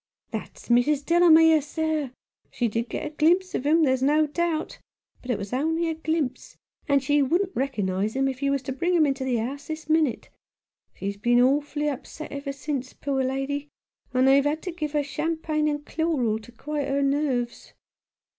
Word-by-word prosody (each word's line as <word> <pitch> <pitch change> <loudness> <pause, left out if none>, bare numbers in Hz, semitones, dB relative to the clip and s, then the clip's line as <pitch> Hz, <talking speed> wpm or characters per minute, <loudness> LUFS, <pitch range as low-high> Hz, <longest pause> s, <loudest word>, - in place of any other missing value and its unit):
"That's - - -7
Mrs. 270 +4 +3
Delamere, 325 -2 +6
sir. 310 -1 -2 0.4
She 240 - -1
did 230 +2 -2
get - - -4
a 300 - -4
glimpse 345 +5 +2
of 280 - -2
him, 320 +2 +4
there's 260 -3 +2
no 300 +3 +4
doubt 325 +1 -2 0.2
— - - -39
but 255 - -12
it 240 - +1
was 200 +2 -6
only 325 +5 0
a - - -1
glimpse, 315 -4 -3 0.3
and 280 -1 +3
she 290 +2 +3
wquldn't 360 +8 +1
rekernise 210 -6 -1
him, 270 0 +2
if 265 0 -4
you 280 - +1
was 275 -1 0
to 265 - -4
bring 345 +7 0
him 320 -3 +5
into 270 -2 -1
the 260 -2 0
house 265 +5 -3
this 315 -1 -6
minute. 310 -6 +1 0.7
She's 200 +1 -4
been 240 +4 +3
awfully 290 +3 +2
upset 295 +2 -6
ever 280 0 -4
since, 275 -2 -4
poor 270 -2 -1
lady, 270 +2 -2 0.4
and 255 +1 +3
they've 275 +1 +6
had 300 +2 -1
to 365 - -3
give 305 -3 -4
her 295 -1 +1
champagne 305 +1 -1
and 295 0 -2
chloral 275 -10 0
to 235 +2 -14
quiet 285 +3 -4
her 280 +1 +1
nerves." 275 -4 -1
285 Hz, 190 wpm, -25 LUFS, 260-310 Hz, 0.7 s, Delamere